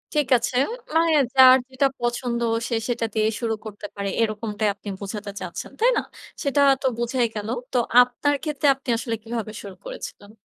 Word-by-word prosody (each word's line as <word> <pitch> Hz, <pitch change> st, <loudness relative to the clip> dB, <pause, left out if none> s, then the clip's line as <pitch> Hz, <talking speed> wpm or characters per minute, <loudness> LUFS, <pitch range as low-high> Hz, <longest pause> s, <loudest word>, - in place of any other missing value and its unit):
ঠিক 295 Hz, -3 st, +2 dB
আছে। 240 Hz, +2 st, -3 dB, 0.4 s
মানে 330 Hz, 0 st, +4 dB, 0.2 s
যার 260 Hz, 0 st, +9 dB
যেটা 265 Hz, +1 st, +2 dB
পছন্দ 240 Hz, 0 st, -1 dB, 0.3 s
সে 235 Hz, -, 0 dB
সেটা 235 Hz, -1 st, 0 dB
দিয়ে 215 Hz, 0 st, +2 dB
শুরু 230 Hz, -2 st, -1 dB
করতে 210 Hz, -1 st, -8 dB
পারে 200 Hz, -1 st, -3 dB
এরকমটাই 215 Hz, -1 st, -1 dB
আপনি 205 Hz, 0 st, -9 dB
বোঝাতে 205 Hz, 0 st, -6 dB
চাচ্ছেন, 180 Hz, -2 st, -6 dB
তাই 480 Hz, +3 st, +5 dB
না? -, -, +2 dB, 0.4 s
সেটা 280 Hz, 0 st, +2 dB, 0.2 s
তো 265 Hz, -, +1 dB
বোঝাই 240 Hz, +1 st, 0 dB
গেল। 210 Hz, +1 st, -4 dB, 0.2 s
তো -, -, +2 dB, 0.2 s
আপনার 250 Hz, +4 st, +1 dB
ক্ষেত্রে 295 Hz, -2 st, 0 dB
আপনি 270 Hz, -1 st, -10 dB
আসলে 230 Hz, -1 st, -2 dB
কীভাবে 225 Hz, -2 st, -4 dB
শুরু 195 Hz, -2 st, -9 dB
করেছিলেন? 205 Hz, +1 st, -8 dB
235 Hz, 170 wpm, -23 LUFS, 210-260 Hz, 0.4 s, যার